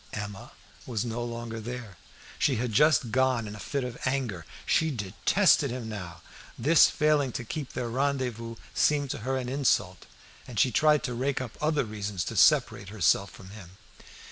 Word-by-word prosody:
Emma 105 Hz, -2 st, -6 dB, 0.4 s
was 115 Hz, -3 st, -2 dB
no 120 Hz, 0 st, -3 dB
longer 115 Hz, -1 st, -5 dB
there. 115 Hz, -3 st, -7 dB, 0.4 s
She -, -, +2 dB
had 120 Hz, 0 st, -2 dB
just 135 Hz, -2 st, +4 dB
gone 130 Hz, -2 st, +1 dB
in 105 Hz, -, -7 dB
a -, -, -10 dB
fit 140 Hz, +5 st, -3 dB
of 125 Hz, -1 st, -6 dB
anger. 125 Hz, -10 st, -2 dB, 0.2 s
She 160 Hz, -, +2 dB
detested 140 Hz, -, +2 dB
him 120 Hz, -2 st, -5 dB
now. 90 Hz, -6 st, -7 dB, 0.3 s
This 155 Hz, +7 st, +6 dB
failing 150 Hz, -3 st, +2 dB
to -, -, -4 dB
keep 140 Hz, +4 st, -6 dB
their 125 Hz, -, -3 dB
rendezvous 125 Hz, -3 st, -2 dB, 0.2 s
seemed 145 Hz, -3 st, +2 dB
to -, -, -4 dB
her 130 Hz, +4 st, -2 dB
an 125 Hz, -1 st, -4 dB
insult, 125 Hz, -9 st, 0 dB, 0.4 s
and 120 Hz, -5 st, -4 dB
she 130 Hz, -, +4 dB
tried 150 Hz, +4 st, +3 dB
to 125 Hz, -, -3 dB
rake 130 Hz, +3 st, -1 dB
up 130 Hz, -3 st, -6 dB
other 150 Hz, -1 st, +1 dB
reasons 105 Hz, -4 st, -4 dB
to -, -, -5 dB
separate 100 Hz, -, +3 dB
herself 100 Hz, -1 st, +2 dB
from 95 Hz, +1 st, -13 dB
him. 95 Hz, -3 st, -12 dB
120 Hz, 175 wpm, -28 LUFS, 105-135 Hz, 0.4 s, This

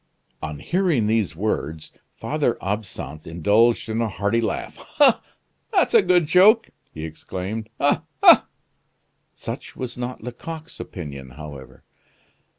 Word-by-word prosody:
On 75 Hz, -1 st, -5 dB
hearing 170 Hz, -, +1 dB
these 105 Hz, -6 st, +1 dB
words, 80 Hz, -5 st, -3 dB, 0.2 s
Father -, -, -1 dB
Absinthe 95 Hz, -7 st, -5 dB
indulged 105 Hz, +10 st, +2 dB
in 110 Hz, +1 st, -1 dB
a 115 Hz, -, 0 dB
hearty 100 Hz, +3 st, 0 dB
laugh: 110 Hz, -, -3 dB, 0.2 s
"Ah! 275 Hz, -5 st, +6 dB, 0.5 s
that's -, -, +2 dB
a 460 Hz, -, +8 dB
good 180 Hz, -, +3 dB
joke!" 190 Hz, +8 st, +5 dB, 0.2 s
he 80 Hz, 0 st, -6 dB
exclaimed. 95 Hz, +7 st, -6 dB
"Ah, 145 Hz, -, +2 dB, 0.2 s
ha!" -, -, +8 dB, 0.8 s
Such -, -, -7 dB
was 125 Hz, -1 st, -6 dB
not 125 Hz, -1 st, -5 dB
Lecoq's 160 Hz, +7 st, -8 dB
opinion, 70 Hz, -8 st, -7 dB
however. 70 Hz, 0 st, -11 dB
110 Hz, 125 wpm, -23 LUFS, 80-130 Hz, 0.8 s, a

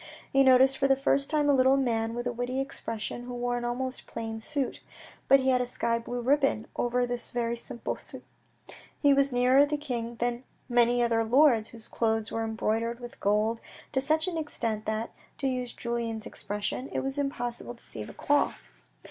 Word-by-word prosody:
He 275 Hz, -, +5 dB
noticed 265 Hz, +1 st, +5 dB
for 275 Hz, -, +3 dB
the 270 Hz, -, +5 dB
first 275 Hz, +1 st, +1 dB
time 300 Hz, -2 st, +2 dB
a 285 Hz, -, +5 dB
little 265 Hz, 0 st, +5 dB
man 230 Hz, -3 st, 0 dB
with 240 Hz, 0 st, -3 dB
a 245 Hz, -, 0 dB
witty 245 Hz, +2 st, -2 dB
expression, 240 Hz, -3 st, -4 dB
who 245 Hz, 0 st, -6 dB
wore 245 Hz, 0 st, -1 dB
an 240 Hz, -, -3 dB
almost 255 Hz, +2 st, -3 dB
plain 225 Hz, -1 st, -5 dB
suit. 275 Hz, +1 st, -3 dB, 0.5 s
But 275 Hz, 0 st, +6 dB
he 260 Hz, -, +2 dB
had 250 Hz, -1 st, +3 dB
a 250 Hz, -, -1 dB
sky 230 Hz, -1 st, 0 dB
blue 245 Hz, +1 st, -4 dB
ribbon 270 Hz, -3 st, +2 dB
over 245 Hz, +1 st, +1 dB
this 245 Hz, -1 st, -3 dB
very 235 Hz, -1 st, -1 dB
simple 235 Hz, 0 st, -5 dB
suit. -, -, -11 dB, 0.8 s
He 285 Hz, -1 st, +5 dB
was 275 Hz, 0 st, +3 dB
nearer 250 Hz, +3 st, +5 dB
the 295 Hz, +1 st, 0 dB
king 240 Hz, -5 st, -4 dB
than 240 Hz, +1 st, -2 dB, 0.2 s
many 240 Hz, 0 st, +3 dB
other 230 Hz, -1 st, +2 dB
lords, 240 Hz, -2 st, +4 dB
whose 230 Hz, -2 st, -13 dB
clothes 225 Hz, -1 st, 0 dB
were 225 Hz, -, -1 dB
embroidered 225 Hz, +1 st, -1 dB
with 240 Hz, -1 st, -10 dB
gold 215 Hz, +3 st, +1 dB, 0.3 s
to 265 Hz, -, +1 dB
such 310 Hz, +5 st, +1 dB
an 340 Hz, -3 st, -2 dB
extent 230 Hz, -8 st, -3 dB
that, 220 Hz, +1 st, -2 dB, 0.3 s
to -, -, -4 dB
use 250 Hz, -2 st, -1 dB
Julien's 235 Hz, -2 st, -3 dB
expression, 210 Hz, +6 st, -4 dB
it -, -, -1 dB
was 270 Hz, +1 st, -2 dB
impossible 245 Hz, -3 st, -3 dB
to 235 Hz, -, -17 dB
see 110 Hz, -, -7 dB
the -, -, -10 dB
cloth. 290 Hz, 0 st, +2 dB
245 Hz, 195 wpm, -28 LUFS, 230-270 Hz, 0.8 s, But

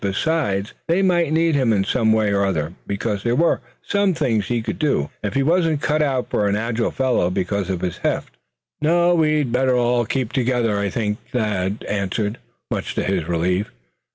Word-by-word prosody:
Besides, 100 Hz, -1 st, 0 dB
they 175 Hz, +4 st, +2 dB
might 175 Hz, -4 st, +2 dB
need 165 Hz, +1 st, +2 dB
him 130 Hz, -5 st, +2 dB
in 100 Hz, -3 st, +2 dB
some 110 Hz, +2 st, +1 dB
way 110 Hz, -2 st, +2 dB
or 100 Hz, 0 st, +2 dB
other; 80 Hz, -4 st, -1 dB
because 100 Hz, 0 st, -2 dB
there 120 Hz, +3 st, 0 dB
were 170 Hz, +4 st, +2 dB, 0.2 s
some 200 Hz, -3 st, +1 dB
things 115 Hz, -10 st, 0 dB
he 120 Hz, -1 st, -1 dB
could -, -, -4 dB
do, 140 Hz, -, 0 dB
if 105 Hz, +4 st, -3 dB
he 135 Hz, -, +3 dB
wasn't 165 Hz, -1 st, +2 dB
cut 155 Hz, 0 st, +1 dB
out 135 Hz, -4 st, 0 dB
for 105 Hz, -, +1 dB
an 100 Hz, -, +1 dB
agile 115 Hz, +2 st, -1 dB
fellow 130 Hz, -9 st, +1 dB
because 95 Hz, +1 st, -2 dB
of 90 Hz, -2 st, -2 dB
his 90 Hz, -2 st, -3 dB
heft. -, -, -2 dB, 0.5 s
"No, 175 Hz, +3 st, +3 dB
we'd 155 Hz, -5 st, +2 dB
better 130 Hz, +1 st, +2 dB
all 120 Hz, -1 st, +2 dB
keep 130 Hz, -3 st, -2 dB
together, 120 Hz, -5 st, +1 dB
I 100 Hz, 0 st, 0 dB
think?" 105 Hz, 0 st, -2 dB
Thad 105 Hz, -4 st, -1 dB
answered, 105 Hz, +3 st, -2 dB, 0.3 s
much -, -, -3 dB
to -, -, 0 dB
his 95 Hz, -5 st, -1 dB
relief. 90 Hz, +4 st, 0 dB
115 Hz, 190 wpm, -21 LUFS, 100-150 Hz, 0.5 s, he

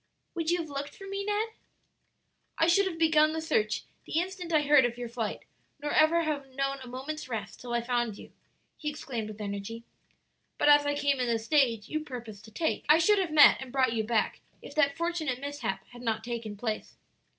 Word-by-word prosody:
"Would 330 Hz, -2 st, -2 dB
you 350 Hz, -, +3 dB
have 330 Hz, -2 st, -4 dB
looked 280 Hz, 0 st, -5 dB
for 390 Hz, -, -10 dB
me, 395 Hz, 0 st, -3 dB
Ned?" 420 Hz, +2 st, 0 dB, 1.1 s
"I 325 Hz, -, +4 dB
should 380 Hz, +4 st, +4 dB
have 340 Hz, -3 st, -4 dB
begun 310 Hz, -1 st, +4 dB
the 320 Hz, -, -2 dB
search 215 Hz, -9 st, 0 dB, 0.2 s
the -, -, -3 dB
instant 360 Hz, -1 st, -4 dB
I 305 Hz, -2 st, +4 dB
heard 290 Hz, -2 st, +6 dB
of 240 Hz, 0 st, -1 dB
your 245 Hz, -1 st, -4 dB
flight, 230 Hz, -2 st, -4 dB, 0.4 s
nor 295 Hz, 0 st, -3 dB
ever 325 Hz, +2 st, +4 dB
have 280 Hz, -4 st, -3 dB
known 275 Hz, 0 st, -1 dB
a 255 Hz, -, -9 dB
moment's 265 Hz, +3 st, -6 dB
rest 215 Hz, -4 st, -5 dB
till 245 Hz, -, -7 dB
I 240 Hz, 0 st, +1 dB
found 240 Hz, -3 st, -1 dB
you!" -, -, -12 dB, 0.5 s
he 300 Hz, -, -3 dB
exclaimed 250 Hz, -7 st, -5 dB
with 215 Hz, 0 st, -9 dB
energy. 205 Hz, +2 st, -5 dB, 0.7 s
"But -, -, +3 dB
as 290 Hz, 0 st, +6 dB
I 290 Hz, -, +1 dB
came 285 Hz, -2 st, +1 dB
in 250 Hz, -, 0 dB
the 230 Hz, -1 st, +2 dB
stage 230 Hz, -3 st, +2 dB
you 310 Hz, -, -2 dB
purposed 235 Hz, -8 st, -8 dB
to 220 Hz, -, -14 dB
take, 320 Hz, +9 st, -1 dB
I 305 Hz, -, +8 dB
should 405 Hz, +5 st, +4 dB
have 360 Hz, -4 st, -1 dB
met 300 Hz, -3 st, +7 dB
and 260 Hz, -2 st, -7 dB
brought 260 Hz, -3 st, +2 dB
you 220 Hz, -1 st, 0 dB
back, 220 Hz, 0 st, 0 dB, 0.2 s
if -, -, -11 dB
that 285 Hz, -1 st, +2 dB
fortunate 330 Hz, -7 st, -1 dB
mishap 280 Hz, -9 st, -4 dB
had 240 Hz, 0 st, -12 dB
not 225 Hz, -2 st, -1 dB
taken 230 Hz, -3 st, -5 dB
place." 220 Hz, 0 st, -4 dB
275 Hz, 215 wpm, -29 LUFS, 235-315 Hz, 1.1 s, I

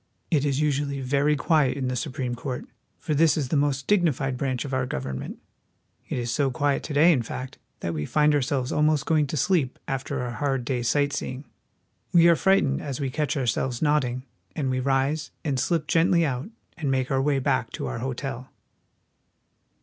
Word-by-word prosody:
It 150 Hz, -3 st, +2 dB
is 140 Hz, -1 st, 0 dB
usually 145 Hz, -2 st, 0 dB
very 140 Hz, +3 st, +2 dB
quiet 145 Hz, -1 st, +2 dB
in 130 Hz, -2 st, -2 dB
the 125 Hz, -, -1 dB
Supreme 130 Hz, -2 st, -3 dB
Court, 125 Hz, +1 st, -5 dB, 0.3 s
for 155 Hz, +1 st, -3 dB
this 160 Hz, +2 st, +4 dB
is 140 Hz, -5 st, -1 dB
the -, -, 0 dB
most 140 Hz, -1 st, +1 dB
dignified 150 Hz, -9 st, +1 dB
branch 130 Hz, -1 st, -2 dB
of 135 Hz, -, -5 dB
our 130 Hz, -1 st, 0 dB
government. 65 Hz, -, -5 dB, 0.7 s
It -, -, -2 dB
is 120 Hz, -1 st, -2 dB
so 140 Hz, -2 st, +1 dB
quiet 140 Hz, +2 st, 0 dB
to 155 Hz, -, -5 dB
day, 160 Hz, +5 st, +6 dB
in 140 Hz, -7 st, +2 dB
fact, 130 Hz, +3 st, -7 dB, 0.2 s
that 85 Hz, -, -2 dB
we 75 Hz, -2 st, -3 dB
find 150 Hz, 0 st, +3 dB
ourselves 135 Hz, -2 st, 0 dB
almost 150 Hz, -1 st, +2 dB
going 155 Hz, -3 st, +2 dB
to 155 Hz, -, -3 dB
sleep 145 Hz, -3 st, +1 dB
after 135 Hz, 0 st, -3 dB
our 120 Hz, -, -3 dB
hard 135 Hz, -1 st, -1 dB
day's 120 Hz, -2 st, -1 dB
sight 145 Hz, +1 st, +1 dB
seeing. 130 Hz, +2 st, -4 dB, 0.7 s
We 170 Hz, -1 st, +6 dB
are 170 Hz, -, +6 dB
fright 195 Hz, +3 st, +3 dB
ened 135 Hz, 0 st, -1 dB
as 140 Hz, -1 st, -4 dB
we 135 Hz, -2 st, -2 dB
catch 150 Hz, +1 st, -1 dB
ourselves 125 Hz, -1 st, -1 dB
nodding, 130 Hz, -5 st, +1 dB, 0.3 s
and 135 Hz, -4 st, -1 dB
we 130 Hz, -, 0 dB
rise, 135 Hz, +4 st, 0 dB, 0.2 s
and 140 Hz, -4 st, 0 dB
slip 165 Hz, +3 st, 0 dB
gently 165 Hz, +2 st, +3 dB
out, 135 Hz, +4 st, -3 dB, 0.3 s
and 155 Hz, -5 st, -2 dB
make 130 Hz, 0 st, 0 dB
our 135 Hz, 0 st, +2 dB
way 140 Hz, 0 st, +2 dB
back 130 Hz, -3 st, 0 dB
to -, -, -4 dB
our -, -, -4 dB
hotel. 130 Hz, 0 st, -4 dB
140 Hz, 195 wpm, -25 LUFS, 130-150 Hz, 0.7 s, day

